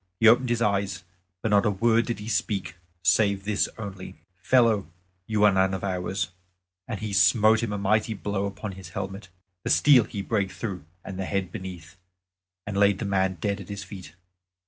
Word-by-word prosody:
He 115 - +5
opened 120 +2 +5
his 120 -1 +1
eyes 100 -3 0 0.4
but 110 - 0
not 100 -1 +5
a 110 - +2
word 115 +3 +2
did 120 - -2
he 105 +1 -8
speak 105 -3 -1 0.3
save 100 +2 +2
this 105 -1 +1
only, 100 -4 -7 0.3
"Fellow, 110 -4 +3 0.4
you 110 -1 +1
are 105 - +7
none 95 0 +2
of 95 - -6
ours," 95 0 -2 0.6
and 110 -4 -4
he 110 -2 -4
smote 110 +3 +5
him 115 -3 -2
a 105 - -2
mighty 110 +3 +1
blow 100 0 -2
upon 100 +1 -6
his 95 -2 -10
helmet. 95 +1 -6 0.3
The - - -3
steel 135 -6 +6
he 100 -1 -5
brake 100 -3 0
through 95 -9 -5 0.2
and 95 -1 -6
the 95 - -2
head 95 -2 -2
beneath, 95 -3 -8 0.7
and 105 - -5
laid 100 0 +4
the 105 - -4
man 95 -1 +1
dead 100 +4 -2
at 95 - -12
his 100 -1 -5
feet. 95 -2 -11
100 Hz, 190 wpm, -26 LUFS, 95-110 Hz, 0.7 s, are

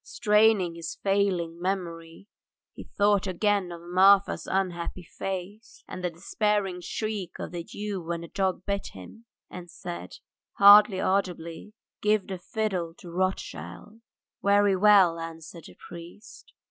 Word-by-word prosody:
straining 210 -5 +2
his 165 0 -7
failing 185 -4 0
memory 170 -2 -4 0.5
he - - -10
thought 205 -1 +3
again 195 0 0
of 170 - -8
Marfa's 190 +3 +4
unhappy 180 -2 -2
face, 195 +5 -7
and 180 - -8
the 180 - 0
despairing 195 +2 -1
shriek 205 -2 -4
of - - -6
the 175 -1 -5
Jew 205 +1 -5
when 170 0 -4
the 170 - -8
dog 190 0 -2
bit 200 0 -2
him, 95 - -13 0.2
and 175 -1 -10
said, 85 - -8 0.4
hardly 205 -1 +7
audibly, 185 0 -2 0.3
"Give 210 -1 +2
the 190 -2 -6
fiddle 180 -4 -3
to 175 - -11
Rothschild." 185 - -4 0.4
"Very 200 -1 +3
well," 190 -4 +5
answered 165 0 -9
the - - -15
priest. 175 +6 -13
185 Hz, 135 wpm, -27 LUFS, 170-205 Hz, 0.5 s, hardly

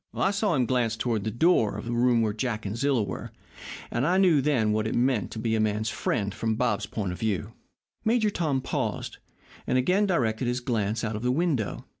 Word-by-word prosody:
"I 195 - +2
saw 200 -3 +1
him 130 -3 +2
glance 120 -3 0
toward 115 -4 -1
the - - 0
door 115 - +2
of 105 - -6
the 120 - -3
room 120 -1 +3
where 105 -2 0
Jack 110 -1 -3
and 100 +2 -3
Zilla 135 -2 +1
were, 95 -3 -6 0.6
and 120 - 0
I 180 +2 +3
knew 175 -7 +5
then 130 -7 +2
what 110 +1 0
it - - -2
meant 120 -5 +1
to - - -8
be 110 0 -1
a 110 - +1
man's 110 0 0
friend 100 -2 -1
from 110 +1 -1
Bob's 120 -3 0
point 100 -5 -3
of 90 - -7
view." 105 -7 -2 0.5
Major 220 -2 +2
Tom 150 -8 0
paused, - - -3 0.5
and - - +2
again 185 +11 +2
directed 120 - 0
his 125 +1 0
glance 115 -3 -1
out 110 -1 -2
of 105 - -4
the 125 +1 +1
window. 140 - -1
120 Hz, 220 wpm, -27 LUFS, 110-135 Hz, 0.6 s, knew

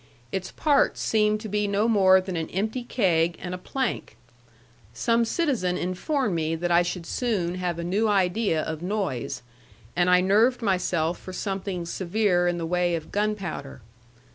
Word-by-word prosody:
Its 190 -1 -3
parts 295 -3 +2
seemed 215 -1 +2
to 215 - -7
be 210 0 0
no 200 +2 +1
more 190 -4 +5
than 185 -1 -5
an 160 -1 -3
empty 215 +7 -2
keg 175 -8 +1
and 180 0 -5
a - - -3
plank. 260 +6 -3 0.8
Some 230 - +2
citizen 225 - 0
informed 205 - -1
me 160 -1 0
that 175 +2 -2
I 170 0 +6
should 175 -1 -3
soon 195 -6 -1
have 180 -2 -2
a 170 - -4
new 200 +6 +1
idea 190 -4 +1
of 160 -1 -5
noise; 175 - -3 0.5
and 175 0 +2
I 180 0 +6
nerved 220 +7 +3
myself 180 -4 0
for 185 - -9
something 190 -2 -3
severe 180 +1 +1
in 175 0 0
the 165 - -3
way 175 0 +1
of 160 -2 -7
gunpowder. 195 - -3
185 Hz, 165 wpm, -25 LUFS, 175-215 Hz, 0.8 s, I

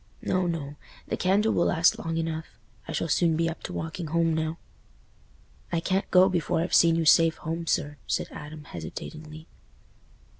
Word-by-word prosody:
"No, 185 -1 +1
no; 150 -4 -4 0.3
the - - 0
candle 205 +4 +2
will 170 - +2
last 165 0 +3
long 165 0 -3
enough—I 160 -1 -6
shall - - -1
soon 165 +1 +2
be 165 +1 +1
up 165 - -5
to - - -6
walking 160 0 -4
home 165 +1 +1
now." 160 +1 -2 1.1
"I 170 - +1
can't 190 +3 -1
go 185 0 +6
before 175 -4 0
I've 170 - -2
seen 165 -1 +6
you 165 -1 0
safe 165 +1 +5
home, 165 +1 -4
sir," 145 -1 0
said - - -1
Adam, 150 +1 -9
hesitatingly. 155 - -8
165 Hz, 165 wpm, -27 LUFS, 155-170 Hz, 1.1 s, go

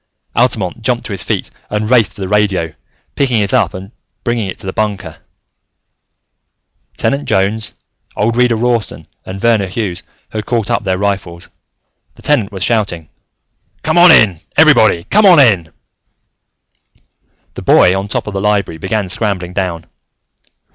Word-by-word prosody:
Altamont 115 -5 0
jumped 120 +1 -1
to 105 - -5
his 95 - -3
feet - - -3 0.2
and 105 0 -2
raced 115 -5 +3
for - - -10
the 95 - -3
radio, 100 -5 0 0.4
picking 125 -5 +1
it 100 -2 +1
up - - +1
and 95 +2 -9 0.3
bring 120 -1 -1
it 95 -4 -4
to - - -12
the 95 - -4
bunker. 100 -6 -3 1.8
Tenant 140 +1 -1
Jones, 100 +3 0 0.4
old 115 +2 0
Reader 125 -1 +3
Rawson, 115 -2 -1 0.2
and 95 +1 -6
Verner 110 -3 +2
Hughes 95 -2 -4 0.3
had 110 -1 -5
caught 115 -4 -1
up - - +1
their 95 -2 -1
rifles. 95 -3 -3 0.7
The - - -18
Tenant 120 -9 +1
was 95 -3 -4
shouting. 95 -8 -1 0.7
"Come - - +2
on 175 0 +8
in! 100 - +5 0.2
Everybody, 85 - +5
come 210 - +3
on 175 -4 +7
in!" 95 - +3 1.8
The - - -8
boy 90 - +4
on 95 +1 -3
top 105 - -3
of 105 - -6
the 95 - -2
library 100 -5 0
began 95 +3 -2
scrambling 90 -2 -3
down. 90 -4 -3
105 Hz, 155 wpm, -14 LUFS, 95-115 Hz, 1.8 s, on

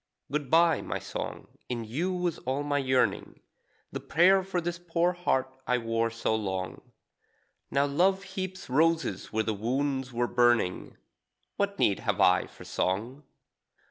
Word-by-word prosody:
Good 145 -2 -2
bye, 165 +1 +4
my - - -3
song, - - -6 0.2
in 120 -2 -2
you 155 +12 -2
was 180 -2 -2
all 135 +3 -2
my 145 0 0
yearning, 130 -6 0 0.5
The - - -4
prayer 190 +3 +4
for 185 -1 -2
this 170 0 -3
poor 175 +1 +1
heart 130 -7 -1
I 125 - +3
wore 115 -1 0
so 115 -1 -1
long. 95 -4 -3 0.9
Now 140 +1 +2
love 185 +7 +2
heaps 190 -1 -6
roses 160 - +1
where 110 0 +1
the 110 - -1
wounds 130 +4 -1
were 120 0 0
burning; 120 -6 +1 0.6
What 200 0 -1
need 100 - +2
have - - -1
I - - +4
for - - -14
song? 115 +10 -2
140 Hz, 150 wpm, -28 LUFS, 115-175 Hz, 0.9 s, bye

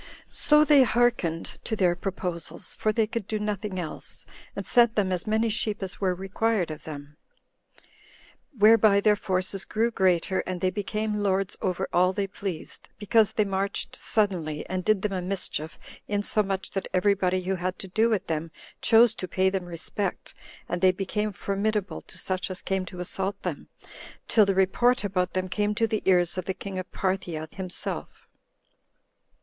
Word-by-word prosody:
So 300 0 +5
they 295 -3 +7
hearkened 235 -9 +1
to 220 - -2
their 180 -4 +2
proposals, 180 -2 -4
[for 215 - +1
they 220 +1 +2
could 225 -2 -4
do 215 - -1
nothing 210 -2 -3
else,] 170 -4 -5 0.3
and - - -4
sent 235 -2 +4
them 195 -3 +1
as 180 +1 0
many 220 +2 +2
sheep 210 -2 -1
as 190 +1 -6
were 185 -2 +1
required 195 0 0
of 155 0 -9
them; 145 -1 -9 1.4
whereby 215 -1 +6
their 210 +1 +4
forces 190 -1 -1
grew 230 +2 0
greater, 190 -2 +2
and 185 -1 -3
they 185 +1 +1
became 210 +1 -2
lords 195 -1 0
over 185 -2 -1
all 180 +1 +4
they 200 0 -1
pleased, 195 -3 -6
because 215 0 +3
they 215 - +2
marched 195 0 -2
suddenly, 175 -8 -1
and 185 0 -2
did 215 -2 +2
them 210 -2 0
a 185 - -1
mischief, 180 -4 -3 0.3
insomuch 205 -1 -1
that 195 - -3
every 200 +2 +4
body 185 -1 0
who 190 +1 -1
had 185 0 -2
to 195 - -7
do 220 +5 +2
with 215 -4 0
them 160 0 -2 0.3
chose 230 0 +6
to 185 - -5
pay 190 +2 +2
them 190 -2 -2
respect; 175 +3 -4 0.3
and 175 - -3
they 185 -1 +6
became 210 +3 -2
formidable 200 +1 -2
to - - -5
such 185 0 -2
as 185 -1 -6
came 190 -1 -1
to 180 - -9
assault 190 +2 -2
them, - - -4 0.6
till 215 -3 +5
the 195 - +2
report 225 +7 +3
about 185 -3 -1
them 185 0 -1
came 210 +2 0
to 225 - +2
the 220 -1 -1
ears 180 -1 +3
of 180 - -5
the 190 - -2
king 195 -2 -5
of 185 - -7
Parthia 185 -5 -2
himself. 185 -2 -5
195 Hz, 175 wpm, -26 LUFS, 185-210 Hz, 1.4 s, they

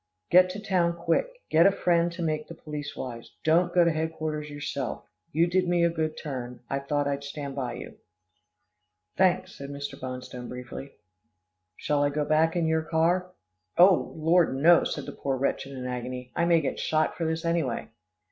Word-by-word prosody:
"Get 180 +1 +7
to 190 +3 -5
town 180 -4 +1
quick. 170 - +1 0.2
Get 165 +3 +6
a - - +5
friend 175 -3 +2
to 170 0 -4
make 155 -1 -1
the 170 - -9
police 150 -2 -6
wise. 120 -3 -7
Don't 170 +3 +3
go 175 0 +5
to 170 - +4
headquarters 155 -1 -3
yourself. 145 0 -4 0.3
You 165 +3 +3
did 180 +1 +1
me 175 -1 +2
a 170 - +3
good 160 -1 -2
turn. 125 -4 -6
I 140 - 0
thought 145 +1 -1
I'd 140 0 -2
stand 140 -1 -6
by 130 -3 -3
you." - - -9 1.2
"Thanks," 185 0 +2
said 140 0 -7
Mr. 140 -1 -6
Bonstone 125 -1 -6
briefly. 125 +2 -8 0.8
"Shall 145 -1 0
I 145 - +3
go 150 +1 -1
back 155 +2 +3
in 170 -2 +1
your 160 0 +2
car?" 170 +3 +1 0.5
"Oh! 180 0 +6
Lord, 165 -2 +3
no," 165 +5 +6
said - - -3
the - - -6
poor 135 -1 -2
wretch 135 0 -1
in 135 -1 -8
an 125 - -5
agony. 125 0 -5
"I 170 - +2
may 170 -1 +4
get 135 -3 -3
shot 155 0 +1
for 165 - -2
this, 160 +1 -2
anyway." 165 -8 -1
155 Hz, 190 wpm, -27 LUFS, 140-170 Hz, 1.2 s, Get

